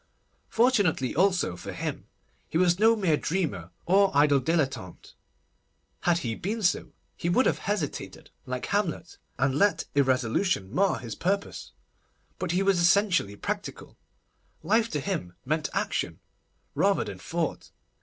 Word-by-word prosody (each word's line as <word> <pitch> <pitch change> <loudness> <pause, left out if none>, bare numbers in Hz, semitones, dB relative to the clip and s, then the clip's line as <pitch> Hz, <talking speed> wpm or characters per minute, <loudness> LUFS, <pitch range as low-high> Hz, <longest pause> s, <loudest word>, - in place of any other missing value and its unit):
Fortunately 205 - +2
also, 180 - +2
for 90 - -7
him, - - -5 0.4
he - - -1
was 180 0 +3
no 225 +1 +5
mere 180 -8 +2
dreamer, 145 - -2 0.2
or 195 +2 +4
idle 145 -1 +5
dilettante. 135 - -2 0.9
Had 175 -1 +2
he 115 - -1
been 210 - -4
so, 180 - 0 0.2
he 170 - -2
would 250 +9 +3
have - - +1
hesitated, 200 -8 -4 0.2
like 125 0 -3
Hamlet, 185 -5 -2 0.2
and 135 -1 +1
let 200 +8 +2
irresolution 130 - +1
mar 195 +1 +2
his 115 -3 -7
purpose. 200 - -3 0.7
But 185 - -3
he 180 +3 +1
was 195 -2 +3
essentially 175 - +3
practical. - - -5 0.7
Life 220 +6 +2
to 150 - -2
him 140 - -3
meant 155 +2 -1
action, - - -2 0.5
rather - - +2
than - - -8
thought. - - -3
170 Hz, 135 wpm, -27 LUFS, 135-200 Hz, 0.9 s, no